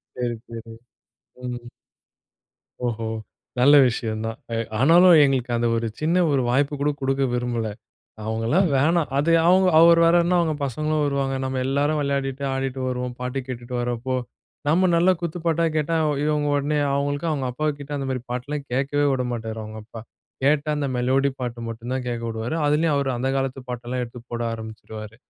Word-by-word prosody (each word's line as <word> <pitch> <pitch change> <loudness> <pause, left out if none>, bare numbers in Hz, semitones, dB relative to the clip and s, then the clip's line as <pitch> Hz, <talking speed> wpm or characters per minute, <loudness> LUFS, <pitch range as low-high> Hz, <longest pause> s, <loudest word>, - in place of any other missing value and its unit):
சரி, 120 -1 -2
சரி. 115 -1 -9 0.8
ம். 120 0 -4 1.3
ஓஹோ! 115 -1 -3 0.5
நல்ல 145 +3 +7
விஷயம் 110 -2 -3
தான். 115 - -4 0.2
எ - - -1 0.2
ஆனாலும் 170 +4 +7
எங்களுக்கு 130 -3 0
அந்த 120 0 +1
ஒரு 115 - -1
சின்ன 170 +4 +2
ஒரு 135 -2 +2
வாய்ப்பு 140 +3 +1
கூட 145 +1 +2
குடுக்க 135 0 0
விரும்பல. 120 -2 -1 0.6
அவங்கலாம் 115 - +1
வேணாம். 160 +3 +2
அது 160 +4 +2 0.2
அவங்க 185 +1 +5
அவர் 170 0 +7
வேற 165 - +5
என்ன 180 +1 +2
அவங்க 160 -3 +1
பசங்களும் 155 +3 -1
வருவாங்க. 140 -1 0
நம்ம 130 0 -2
எல்லோரும் 145 +3 +1
வெளையாடிட்டு 140 -1 -2
ஆடிட்டு 135 0 -3
வருவோம். 125 -1 -3
பாட்டு 125 +2 -3
கேட்டுட்டு 125 -1 -7
வர்றப்போ, 120 +1 -2 0.5
நம்ம 180 +4 +3
நல்ல 175 +3 +4
குத்துப்பாட்டா 170 -1 -1
கேட்டா, 155 +2 0
அவ 150 - +2
இவங்க 150 -1 +1
உடனே 145 +1 0 0.2
அவங்களுக்கும் 145 +3 -1
அவங்க 135 -3 -2
அப்பா 155 +5 -2
கிட்ட 145 0 -10
அந்த 135 -1 -3
மாதிரி 125 -2 -3
பாட்டெல்லாம் 140 +3 -4
கேட்கவே 140 +2 +1
விட 130 -1 0
மாட்டாரு 110 -1 -5
அவங்க 110 +1 -8
அப்பா. 115 0 -10 0.4
கேட்டா 150 +1 +2
அந்த 145 - -1
மெலோடி 135 +3 +2
பாட்டு 120 -1 -4
மட்டும் 115 +2 -7
தான் 130 -1 -3
கேட்க 120 -1 -3
விடுவாரு. 115 +7 -3
அதிலேயும் 150 +1 +2
அவரு 140 -1 0
அந்த 130 +2 -1
காலத்து 135 0 -2
பாட்டெல்லாம் 125 +1 -4
எடுத்து 120 +1 -11
போட 120 0 -3
ஆரம்பிச்சுருவாரு. 110 -1 -8
135 Hz, 170 wpm, -23 LUFS, 120-150 Hz, 1.3 s, நல்ல